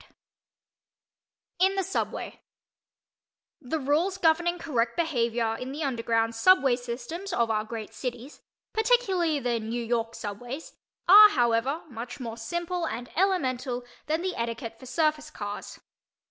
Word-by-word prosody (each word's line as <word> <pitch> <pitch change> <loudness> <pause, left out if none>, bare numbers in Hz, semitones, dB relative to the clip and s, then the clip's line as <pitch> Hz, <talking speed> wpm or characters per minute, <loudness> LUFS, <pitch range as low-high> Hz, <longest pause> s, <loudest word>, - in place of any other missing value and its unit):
_ - - -21 1.5
IN 380 +1 +4
THE 390 - +1
SUBWAY 380 +2 -3 1.2
The 280 +3 -2
rules 310 +7 +1
governing 345 0 +2
correct 235 -8 -1
behavior 235 -8 0
in 255 +3 -6
the 300 +3 -4
underground 230 -3 0
"subway" 270 0 +5
systems 250 +11 -6
of 235 -7 +1
our 215 -1 +1
great 220 -1 -7
cities 250 +2 -6 0.3
(particularly 395 -9 +2
the 245 -4 0
New 230 +2 -3
York 230 -1 -1
subways) 245 +8 -6 0.3
are, 420 +3 +11
however, 245 - +1
much 240 0 -7
more 230 -3 -5
simple 345 +8 -2
and 240 -1 -5
elemental 260 -10 0 0.2
than 315 +3 0
the 370 -1 -1
etiquette 230 -1 -4
for 260 - -11
surface 305 +1 0
cars. 205 -7 -7
260 Hz, 130 wpm, -27 LUFS, 230-340 Hz, 1.5 s, are